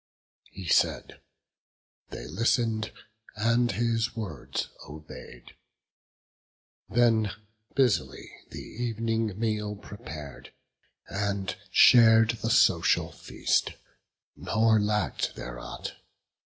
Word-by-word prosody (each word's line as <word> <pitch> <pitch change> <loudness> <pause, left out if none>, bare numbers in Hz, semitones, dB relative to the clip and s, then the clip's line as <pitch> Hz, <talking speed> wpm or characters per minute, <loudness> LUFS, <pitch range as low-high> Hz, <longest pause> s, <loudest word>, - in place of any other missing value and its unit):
He 95 -3 -9
said; - - +1 0.9
they - - -8
listen'd, 115 - 0 0.4
and 115 +3 +2
his 115 0 0
words 110 -4 -4 0.2
obey'd; 75 -5 -11 1.4
Then 115 -3 +3 0.5
busily 130 -5 0 0.2
the 120 +1 -5
ev'ning 115 -2 -2
meal 105 -2 -1
prepar'd, 75 -8 -10 0.5
And 100 -1 -2
shar'd 115 -2 +7
the 115 - -1
social 95 -8 +3
feast; - - -1 0.6
nor 110 -1 +2
lack'd 105 -8 -1
there 60 0 -7
aught. - - -7
110 Hz, 85 wpm, -27 LUFS, 100-115 Hz, 1.4 s, shar'd